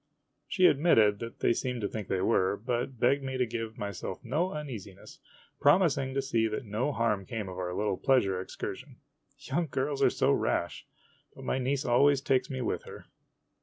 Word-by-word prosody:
' - - -50
She 185 -2 +2
admitted 115 -11 +4
that 115 0 -8
they - - +4
seemed 125 -1 -3
to 100 - 0
think 105 -2 -6
they 95 - -1
were, 95 +2 +2
but 120 +2 -3
begged 140 +3 +3
me 130 -1 -4
to 125 - +2
give 115 -1 -5
myself 100 -3 -5
no 175 +5 0
uneasiness, 115 -11 -8 0.4
promising 145 -4 +3
to 135 - 0
see 115 -4 +1
that 110 +3 -4
no 110 +7 -1
harm 110 -6 0
came 105 +1 -5
of 95 0 -7
our 90 -1 -3
little 105 -3 0
pleasure 100 -9 +2
excursion. - - -7 0.4
Young 165 +4 -2
girls 135 +2 -2
are - - +6
so - - +1
rash! 85 - -1 0.5
but - - -10
my 130 - 0
niece 135 +2 -1
always 140 +3 +4
takes 135 -1 +1
me 130 -1 -3
with 120 - -2
her. - - -11
120 Hz, 190 wpm, -29 LUFS, 105-135 Hz, 0.5 s, are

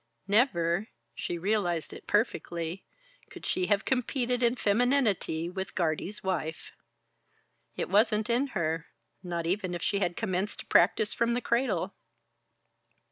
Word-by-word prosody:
Never 195 -4 +2 0.3
she 175 - -3
realized 175 -3 0
it - - -11
perfectly 175 -5 -1 0.5
could - - -10
she 185 -1 0
have 205 -1 +2
competed 250 -1 0
in 240 0 +3
femininity 215 - +2
with 190 +1 -5
Guardie's 175 +5 -1
wife. 160 -4 -3 1.0
It - - -2
wasn't 210 +2 +3
in 245 +4 +2
her, 160 -1 -1 0.3
not 170 -2 -3
even 185 0 -1
if 170 - -5
she 200 - +1
had 175 -3 -1
commenced 195 -2 -2
to - - -14
practise 200 +4 +4
from 235 0 +1
the - - +1
cradle. 245 +3 0
195 Hz, 135 wpm, -29 LUFS, 175-230 Hz, 1.0 s, practise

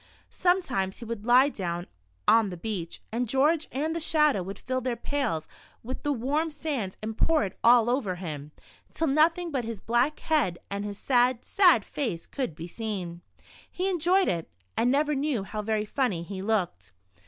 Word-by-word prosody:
Sometimes 355 - +1
he 235 - -8
would 230 -1 -6
lie 255 +3 +6
down 175 -7 -4 0.4
on 225 -3 +5
the 180 - -6
beach, 180 -3 -4
and 235 +1 -1
George 295 +5 +2
and 310 +5 -1
the - - -1
Shadow 300 - +3
would 195 +2 -7
till 255 0 -1
their 250 -1 -1
pails 235 - -2 0.4
with 255 +3 -5
the 290 - 0
warm 285 +6 0
sand 290 -10 -3
and 220 0 -3
pour 325 +4 +3
it 195 -2 -4
all 235 -1 +6
over 240 -7 0
him, 155 -5 -6 0.4
till 325 - +1
nothing 325 +4 +3
but 265 -4 -1
his 225 -2 -5
black 240 +8 +1
head, 285 - +1
and 200 0 -2
his 205 -1 -5
sad, 250 0 +2
sad 355 - +5
face 225 - -3
could 255 - -4
be 165 - -7
seen. 180 -3 -5 0.5
He 370 +2 -2
enjoyed 365 +2 +3
it, 165 -2 -1 0.3
and 240 - +2
never 295 +3 +2
knew 275 -6 0
how 210 +2 -4
very 215 0 -1
funny 215 -8 -1
he 190 +2 -6
looked. 175 - -1
235 Hz, 180 wpm, -27 LUFS, 195-290 Hz, 0.5 s, lie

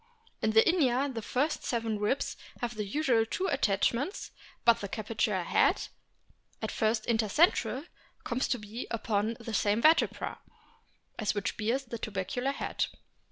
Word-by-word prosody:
In 220 - +2
Inia 265 +1 +4
the 225 - -4
first 280 +8 -1
seven 225 -3 -1
ribs 210 +7 0 0.2
have 240 -2 -2
the 210 -2 -3
usual 250 -1 +2
two 370 +12 -2
attachments, 265 - 0 0.3
but 235 -1 +5
the 200 - -4
capitular 215 -3 -1
head, - - +2 0.7
at - - -3
first 220 0 0
inter 225 -2 +1
central, 265 - +3 0.4
comes 245 +2 -1
to 250 - 0
be 215 +3 -7
upon 220 0 -1
the 230 -1 -6
same 205 +1 +2
vertebra 315 +6 +3 0.8
as 215 -2 +1
that - - -18
which 205 - -2
bears 235 +5 0
the 235 -1 -6
tubercular 220 +7 -2
head. 280 - -2
230 Hz, 150 wpm, -30 LUFS, 215-260 Hz, 0.8 s, but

